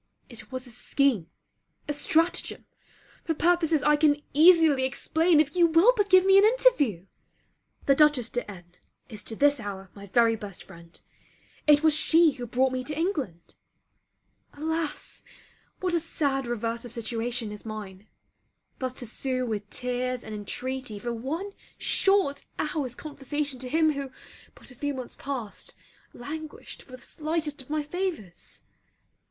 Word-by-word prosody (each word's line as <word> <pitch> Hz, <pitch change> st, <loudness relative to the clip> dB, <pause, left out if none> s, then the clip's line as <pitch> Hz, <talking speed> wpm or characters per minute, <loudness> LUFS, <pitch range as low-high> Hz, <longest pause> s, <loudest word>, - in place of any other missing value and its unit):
It 230 Hz, -2 st, -11 dB
was 255 Hz, 0 st, -4 dB
a 245 Hz, -, -8 dB
scheme, 245 Hz, -, 0 dB, 0.6 s
a 295 Hz, -, -1 dB
stratagem 320 Hz, +4 st, 0 dB, 0.6 s
for 325 Hz, -, -1 dB
purposes 330 Hz, -2 st, +2 dB
I 300 Hz, 0 st, +4 dB
can 295 Hz, -1 st, +3 dB
easily 320 Hz, -3 st, +6 dB
explain 320 Hz, +5 st, +2 dB
if 305 Hz, +2 st, +1 dB
you 345 Hz, -1 st, +5 dB
will 335 Hz, +9 st, +5 dB
but 410 Hz, -3 st, +1 dB
give 370 Hz, 0 st, +6 dB
me 390 Hz, 0 st, +7 dB
an -, -, +5 dB
interview. 415 Hz, -, +3 dB, 0.8 s
The 275 Hz, -, +5 dB
Dutchess 280 Hz, -5 st, +3 dB
de 245 Hz, -3 st, -3 dB
N 180 Hz, -4 st, -10 dB, 0.4 s
is 215 Hz, -4 st, -8 dB
to 225 Hz, -, -5 dB
this 285 Hz, +2 st, +3 dB
hour 195 Hz, -3 st, -7 dB
my 200 Hz, 0 st, -11 dB
very 230 Hz, +3 st, +3 dB
best 205 Hz, -4 st, -8 dB
friend; 170 Hz, -2 st, -14 dB, 0.7 s
it 295 Hz, 0 st, +6 dB
was 315 Hz, -1 st, +5 dB
she 320 Hz, +1 st, +4 dB
who 245 Hz, -3 st, -7 dB
brought 255 Hz, +3 st, +2 dB
me 255 Hz, 0 st, -2 dB
to 295 Hz, +1 st, -5 dB
England. 285 Hz, -, -3 dB, 1.0 s
Alas, 315 Hz, 0 st, -3 dB, 0.6 s
what 365 Hz, -2 st, 0 dB
a 340 Hz, -, +3 dB
sad 280 Hz, -5 st, -1 dB
reverse 230 Hz, 0 st, -3 dB
of 245 Hz, -, -9 dB
situation 230 Hz, -1 st, -2 dB
is 210 Hz, -, -9 dB
mine! 210 Hz, -2 st, -8 dB, 0.7 s
thus 255 Hz, -1 st, -3 dB
to 250 Hz, -, -5 dB
sue 255 Hz, +2 st, -2 dB
with 210 Hz, -3 st, -4 dB
tears 250 Hz, 0 st, -2 dB
and 220 Hz, -, -8 dB
intreaty 250 Hz, +3 st, -4 dB
for 240 Hz, +3 st, -4 dB
one 310 Hz, -, -4 dB, 0.3 s
short 390 Hz, -8 st, +2 dB
hour's 295 Hz, -5 st, -2 dB
conversation 290 Hz, -2 st, -4 dB
to 255 Hz, 0 st, -5 dB
him 315 Hz, +2 st, +3 dB
who, 280 Hz, -2 st, -4 dB, 0.5 s
but -, -, -11 dB
a -, -, -14 dB
few 285 Hz, +3 st, -3 dB
months 255 Hz, -2 st, -7 dB
past, 255 Hz, -7 st, -6 dB, 0.4 s
languished 310 Hz, +4 st, -8 dB
for 255 Hz, -, -17 dB
the 255 Hz, -, -10 dB
slightest 310 Hz, -2 st, -3 dB
of 260 Hz, -, -17 dB
my 305 Hz, 0 st, -1 dB
favours! 300 Hz, -, -5 dB
270 Hz, 155 wpm, -27 LUFS, 235-315 Hz, 1.0 s, me